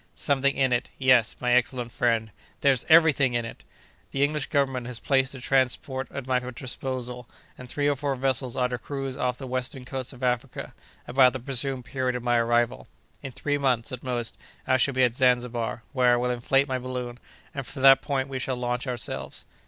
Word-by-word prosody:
"Something 140 -1 +1
in 130 -2 +2
it—yes, 125 -1 +2
my 125 -1 0
excellent 125 -1 +1
friend—there's 115 +3 0
every 160 -1 +7
thing 130 -3 +1
in 120 -1 0
it. 115 - -9 0.5
The 140 - 0
English 150 0 0
Government 135 -5 0
has 125 -2 -4
placed 135 -1 +1
a - - -8
transport 130 +1 0
at 140 - -6
my 130 -1 +1
disposal, 125 0 -5 0.3
and 125 -1 -11
three 145 +2 0
or 145 - +2
four 140 0 -2
vessels 130 -1 0
are 125 -1 +1
to 125 -1 -4
cruise 135 +1 -5
off 125 -2 -1
the 135 - -7
western 130 0 -4
coast 130 0 -5
of 130 -1 -12
Africa, 125 +1 -2 0.3
about 125 +1 +5
the 130 - -4
presumed 130 0 -1
period 130 -1 -2
of 125 - -4
my 120 -1 +2
arrival. 120 0 +1 0.3
In 135 - -6
three 145 +3 -2
months, 125 -5 +1
at 130 -1 -6
most, 120 -3 -3 0.3
I 130 - +3
shall 135 +1 +1
be 130 - +3
at 120 -2 +3
Zanzibar, 120 -2 +1
where 125 -3 +4
I - - +5
will 125 +1 0
inflate 135 +3 +2
my 130 -1 -1
balloon, 125 -1 -5 0.3
and 135 - -4
from 135 +2 -7
that 135 0 +8
point 135 -2 -1
we 135 -1 -4
shall 130 0 -2
launch 125 +1 -2
ourselves." 70 - -3
130 Hz, 200 wpm, -26 LUFS, 120-135 Hz, 0.5 s, that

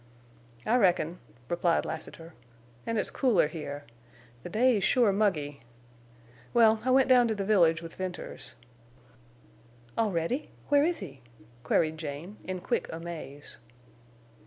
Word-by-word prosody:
"I 240 - +3
reckon," 180 -5 +2 0.3
replied 170 +1 +1
Lassiter. 165 +1 -7 0.5
"An' 230 - 0
it's - - 0
cooler 235 - +3
here. 145 -2 -6 0.6
The 175 - -7
day's 225 0 +3
sure 235 0 +4
muggy. 155 -9 0 1.0
Well, 220 -2 +5
I 260 - 0
went 265 +1 +5
down 250 -2 +6
to 220 - -1
the 200 -1 -3
village 170 -5 +4
with 165 - -8
Venters." 185 -8 -5 1.4
"Already! 210 - 0 0.2
Where 285 0 +5
is 340 +2 0
he?" 135 -1 -9 0.4
queried 155 +4 +1
Jane, 160 +7 -6
in 185 -1 -5
quick 235 - -2
amaze. 160 -4 -8
185 Hz, 125 wpm, -29 LUFS, 160-225 Hz, 1.4 s, down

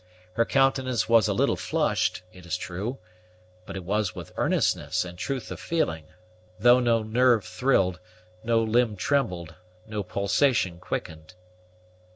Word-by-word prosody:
Her 115 - +2
countenance 130 -3 +1
was 115 -3 +5
a - - +1
little - - +2
flushed, 90 - 0
it 90 - -14
is 90 +2 -1
true; 100 +9 -5 0.7
but - - -7
it 95 - -5
was 100 0 -1
with - - -8
earnestness - - 0
and 90 0 -8
truth 130 +7 -4
of - - -6
feeling, 80 - -1 0.5
though 120 +3 +6
no 115 -2 +2
nerve 120 0 +3
thrilled, 90 -3 +1 0.4
no 115 0 +2
limb 110 0 +2
trembled, 90 - -1 0.3
no 110 -1 -4
pulsation 100 -1 +1
quickened. 80 -1 -6
110 Hz, 140 wpm, -26 LUFS, 90-125 Hz, 0.7 s, though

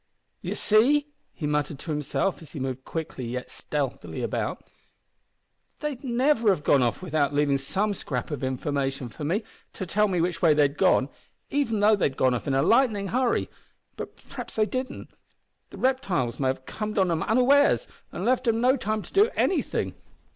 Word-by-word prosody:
"You - - -3
see," 280 +8 +3 0.2
he 150 - -6
muttered 150 -1 -1
to 160 - -6
himself, 150 +6 -1
as 160 - -13
he 150 - -5
moved 130 0 -4
quickly 160 -5 -5
yet 125 +2 -5
stealthily 140 -3 -4
about, - - -2 1.2
"they'd 290 -4 -4
never 245 -2 +2
have 180 -7 +1
gone 140 -2 +4
off 120 +7 0
without 150 -4 0
leavin' 145 -1 +2
some 195 +10 0
scrap 130 - -4
of 145 -3 -4
information 135 0 -2
for 150 - -9
me, 185 +9 0 0.3
to 190 - -5
tell 210 +4 +2
me 185 -3 0
which 175 +1 -1
way 160 -3 +5
they'd 145 -1 +3
gone, 130 - +4 0.4
even 230 -7 0
though 210 +1 +6
they'd 140 -9 0
gone 130 -1 +3
off 125 - -3
in 135 - +1
a 135 - +3
lightnin' 215 - +3
hurry. 250 +1 +1 0.5
But - - -7
p'raps - - -7
they 215 - +3
didn't. 255 +3 -5 0.6
The - - -11
reptiles 200 - 0
may 135 - +1
have 130 0 -2
comed 215 0 -4
on 190 -3 +3
'em 165 -1 0
unawares, 275 - +4 0.2
an' - - -4
left 255 0 +1
'em 225 0 +3
no 255 +3 +4
time 215 -3 -2
to - - -14
do 415 +4 +5
anything. 375 - 0
180 Hz, 185 wpm, -26 LUFS, 140-235 Hz, 1.2 s, though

